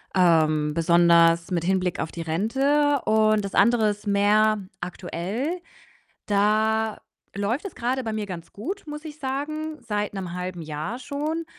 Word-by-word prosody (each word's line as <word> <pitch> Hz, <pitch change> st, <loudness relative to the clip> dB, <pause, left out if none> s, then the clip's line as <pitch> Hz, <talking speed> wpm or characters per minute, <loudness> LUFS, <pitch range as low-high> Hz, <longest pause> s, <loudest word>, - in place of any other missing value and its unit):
ähm, 155 Hz, -4 st, +3 dB
besonders 170 Hz, 0 st, +4 dB
mit 170 Hz, -2 st, 0 dB
Hinblick 185 Hz, -1 st, 0 dB
auf 160 Hz, -, -3 dB
die 170 Hz, -, -6 dB
Rente, 270 Hz, -, +1 dB
und 215 Hz, -1 st, +3 dB
das 195 Hz, -, -6 dB
andere 235 Hz, -3 st, +4 dB
ist 205 Hz, 0 st, -5 dB
mehr 210 Hz, +1 st, +3 dB, 0.2 s
aktuell. 190 Hz, -, -4 dB, 0.7 s
Da 215 Hz, +2 st, +1 dB, 0.4 s
läuft 215 Hz, -, -1 dB
es 395 Hz, -, -8 dB
grade 255 Hz, +2 st, -2 dB
bei 220 Hz, -, -2 dB
mir 215 Hz, -1 st, -3 dB
ganz 175 Hz, -4 st, -8 dB
gut, 355 Hz, -, -6 dB
muss 300 Hz, +1 st, -7 dB
ich 305 Hz, -1 st, -9 dB
sagen, 305 Hz, +3 st, -4 dB
seit 210 Hz, -2 st, -2 dB
'nem 185 Hz, -3 st, -5 dB
1/2 180 Hz, -1 st, -5 dB
Jahr 155 Hz, +9 st, -5 dB
schon. 300 Hz, +5 st, -3 dB
210 Hz, 150 wpm, -24 LUFS, 175-260 Hz, 0.7 s, besonders